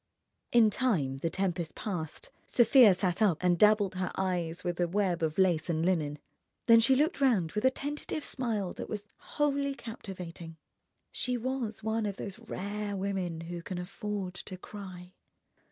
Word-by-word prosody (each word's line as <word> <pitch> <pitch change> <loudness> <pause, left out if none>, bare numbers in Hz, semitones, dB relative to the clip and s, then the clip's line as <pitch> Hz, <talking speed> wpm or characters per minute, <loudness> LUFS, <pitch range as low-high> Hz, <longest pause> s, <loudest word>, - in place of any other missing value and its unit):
In 225 -3 +6
time 165 - +1
the 165 - -1
tempest 175 -2 -2
passed, 170 -7 -5 0.2
Sofia 235 -4 +6
sat 185 +2 -1
up 195 -7 +4
and 175 -2 +2
dabbled 210 -2 +5
her 185 -1 -2
eyes 175 -3 -2
with 175 0 -2
a 175 - +2
web 185 -2 0
of 160 -1 -1
lace 175 -4 +2
and 165 0 +1
linen. 155 -5 +1 0.5
Then 230 -1 +8
she 230 +4 +5
looked 300 +2 +1
round 210 - +3
with 210 +3 -1
a - - +8
tentative 295 +3 -4
smile 220 -8 -2
that - - -7
was 210 -1 -5
wholly 280 -1 -1
captivating. 180 -8 -8 0.5
She 250 0 -1
was 240 -3 -3
one 220 0 0
of 200 - -3
those 200 +1 -6
rare 205 -2 -4
women 190 -4 -2
who 170 +1 -6
can 180 +1 -5
afford 195 +1 -4
to 185 0 -7
cry. 185 -2 -10
195 Hz, 165 wpm, -30 LUFS, 175-225 Hz, 0.5 s, Then